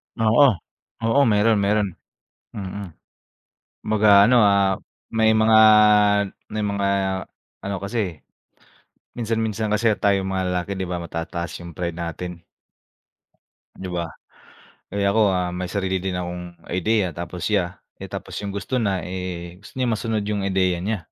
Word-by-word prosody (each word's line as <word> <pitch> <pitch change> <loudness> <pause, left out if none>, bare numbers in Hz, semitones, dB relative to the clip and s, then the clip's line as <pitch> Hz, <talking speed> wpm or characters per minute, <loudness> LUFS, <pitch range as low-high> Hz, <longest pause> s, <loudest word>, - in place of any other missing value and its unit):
Oo, 120 +5 +5 0.6
oo, 115 +5 +3
meron, 105 0 +3
meron, 100 +1 +2 0.6
mm. 100 0 -6 1.0
Kumbaga 105 -2 +6
ano, 120 +1 +5
ah, 100 -2 +3 0.3
may 110 0 +3
mga, 110 0 +5 0.9
may 105 -1 -3
mga 100 -1 0 0.7
ano 100 0 -3
kasi, 100 -5 -4 0.9
minsan 115 -1 -1
minsan 110 -1 -1
kasi 115 +2 +3
tayong 100 -2 +1
mga 95 -1 -1
lalaki, 90 +2 -2
'di 95 - -2
ba, 90 -1 -4
matataas 85 +1 -5
yung 85 - -9
pride 85 -1 -4
natin? 85 0 -6 1.3
'Di 95 -1 -7
ba? 85 -1 -2 0.8
Kaya 100 -1 0
ako, 110 0 +3
ah, 90 -1 -1
may 90 0 -4
sarili 95 -2 -1
din 95 -1 -3
akong 90 -1 -6 0.2
ideya, 95 0 +1
tapos 85 0 -6
siya, 95 -4 0 0.2
eh, - - -7
tapos - - -7
yung 100 -1 -5
gusto 125 +5 -2
na, 95 -5 -1
eh, 90 -1 -6
gusto 105 - -15
niya 125 -3 +1
masunod 110 -1 -1
yung 105 -1 -2
ideya 95 -2 +1
niya. 105 +2 -1
100 Hz, 140 wpm, -23 LUFS, 90-110 Hz, 1.3 s, Kumbaga